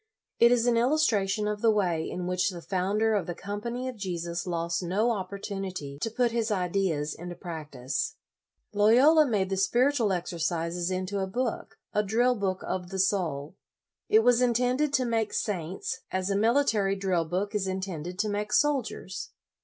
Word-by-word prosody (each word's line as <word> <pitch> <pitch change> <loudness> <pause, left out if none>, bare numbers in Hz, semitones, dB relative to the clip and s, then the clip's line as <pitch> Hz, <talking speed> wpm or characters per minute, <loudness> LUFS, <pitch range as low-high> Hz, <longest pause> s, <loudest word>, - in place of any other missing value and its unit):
It 235 0 +7
is 240 -1 +3
an 240 -1 +3
illustration 225 -6 +2
of 210 0 -2
the 230 - +4
way 180 -7 +1
in 180 - -4
which 180 +1 +1
the 180 -3 -7
founder 205 +4 +1
of 200 -6 0
the 175 - -4
Com 205 +3 -5
pany 240 +3 -3
of 255 -3 -5
Jesus 175 -3 -4
lost 170 0 -1
no 200 +7 +1
opportunity 190 -7 -5
to 225 - -1
put 240 +1 +1
his 230 -1 0
ideas 180 -6 0
into 175 +1 -7
practice. 155 -7 -4 0.6
Loyola 255 +10 +6
made 195 -5 0
the 195 - 0
Spiritual 240 +3 +2
Exercises 170 0 -2
into 185 +2 -2
a 190 - -1
book, 240 +4 -3 0.2
a 210 - +3
drill 235 +5 +2
book 195 -4 -2
of 180 -1 -3
the 190 - -5
soul. 175 -6 0 0.5
It 220 +1 +5
was 245 0 +4
intended 250 +4 +2
to 260 -3 +2
make 225 -2 0
saints, 195 +6 -3
as 185 +1 -1
a - - +1
military 220 -3 +2
drill 190 -4 0
book 185 +6 -2
is 200 -2 -1
intended 185 -2 -4
to 215 +2 0
make 210 0 -2
soldiers. 270 -9 0
195 Hz, 170 wpm, -28 LUFS, 180-230 Hz, 0.6 s, It